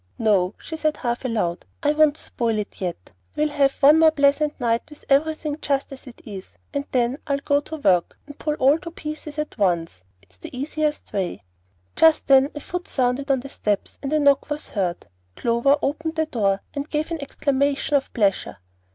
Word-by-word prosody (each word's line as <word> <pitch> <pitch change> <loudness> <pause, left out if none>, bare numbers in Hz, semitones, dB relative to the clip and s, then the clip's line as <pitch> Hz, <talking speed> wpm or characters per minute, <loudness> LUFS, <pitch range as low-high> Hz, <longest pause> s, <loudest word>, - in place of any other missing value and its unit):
"No," 200 -4 +2
she 320 - -7
said 310 -1 0
half 240 -1 -2
aloud, 210 -8 -1 0.2
"I 295 0 +3
won't 305 -1 +4
spoil 230 -7 -2
it 210 0 -5
yet. 175 - -5 0.2
We'll 300 0 +1
have 280 -2 +2
one 300 +3 +8
more 320 0 +7
pleasant 295 0 +2
night 235 -2 +1
with 300 - -14
everything 305 +1 +1
just 275 -1 -1
as 270 +1 -13
it 245 - -13
is, 195 -3 -9 0.2
and 280 0 -2
then 250 +2 +1
I'll 280 -1 +1
go 285 +1 +1
to 310 +2 -7
work 185 - +2
and 290 0 -11
pull 300 -1 -1
all 280 +3 +4
to 335 - -7
pieces 305 -2 -7
at 300 -5 -4
once. 170 - 0 0.2
It's 90 -2 -25
the 250 - -9
easiest 300 +1 -2
way." 180 - -2 0.5
Just 320 -1 +5
then 270 0 +5
a 295 - -5
foot 355 +3 -5
sounded 255 +2 0
on 265 -2 +2
the 275 - -9
steps, 205 -6 -2
and 275 - -4
a 310 - +3
knock 280 -1 +3
was 295 0 -4
heard. 180 -4 -2 0.3
Clover 235 +5 +2
opened 315 +3 -2
the 315 0 +1
door, 200 -8 0
and 285 +1 -4
gave 305 +2 -2
an 330 -2 -3
exclamation 280 +1 0
of 275 - 0
pleasure. 200 - 0
280 Hz, 195 wpm, -23 LUFS, 230-300 Hz, 0.5 s, one